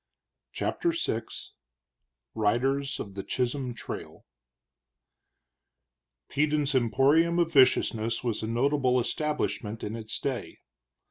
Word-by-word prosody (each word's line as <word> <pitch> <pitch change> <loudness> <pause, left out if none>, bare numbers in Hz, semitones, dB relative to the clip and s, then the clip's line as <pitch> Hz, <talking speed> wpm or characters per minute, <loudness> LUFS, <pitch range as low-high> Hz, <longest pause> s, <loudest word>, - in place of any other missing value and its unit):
CHAPTER 340 -1 -1
VI 220 - -1 1.1
RIDERS 135 +6 0
OF 100 - -6
THE 100 - -4
CHISHOLM 125 0 -2
TRAIL - - -8 2.0
Peden's 150 0 +1
emporium 140 +7 +3
of 170 -1 +1
viciousness 115 -4 +3
was 115 -4 -1
a 110 - -3
notable 125 +2 +2
establishment 125 -5 -2
in 105 +2 -3
its 110 -2 -5
day. 135 -3 -4
130 Hz, 95 wpm, -28 LUFS, 115-145 Hz, 2.0 s, emporium